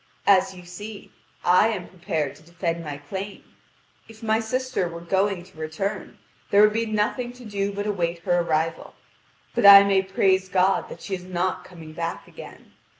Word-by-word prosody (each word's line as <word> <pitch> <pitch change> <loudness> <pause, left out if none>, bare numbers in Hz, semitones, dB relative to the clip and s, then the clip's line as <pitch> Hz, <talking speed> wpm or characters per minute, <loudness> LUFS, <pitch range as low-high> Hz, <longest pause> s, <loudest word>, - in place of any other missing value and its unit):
As 190 -1 +4
you 180 -1 -12
see, 205 +4 -9 0.3
I 180 +4 +5
am 200 -6 -3
prepared 160 -5 -3
to - - -18
defend 170 0 -4
my 145 -2 -5
claim. 190 +8 -7 0.6
If 225 0 -15
my 220 0 +2
sister 255 -3 -1
were 170 0 -7
going 190 +2 0
to 185 -2 -20
return, 185 +6 -4 0.3
there 200 - +5
would 210 0 +5
be 230 +1 -1
nothing 215 +3 -1
to 250 -1 -13
do 200 -1 -2
but 205 +1 -4
await 175 -5 -1
her 175 +1 +2
arrival. 165 -1 -1 0.6
But 235 -4 +4
I 200 0 +11
may 195 -1 +3
praise 190 0 +1
God 190 +1 +2
that - - -10
she 200 - -5
is 180 -1 -4
not 185 0 -2
coming 165 -3 -12
back 165 0 -4
again. - - -13
190 Hz, 180 wpm, -24 LUFS, 170-205 Hz, 0.6 s, I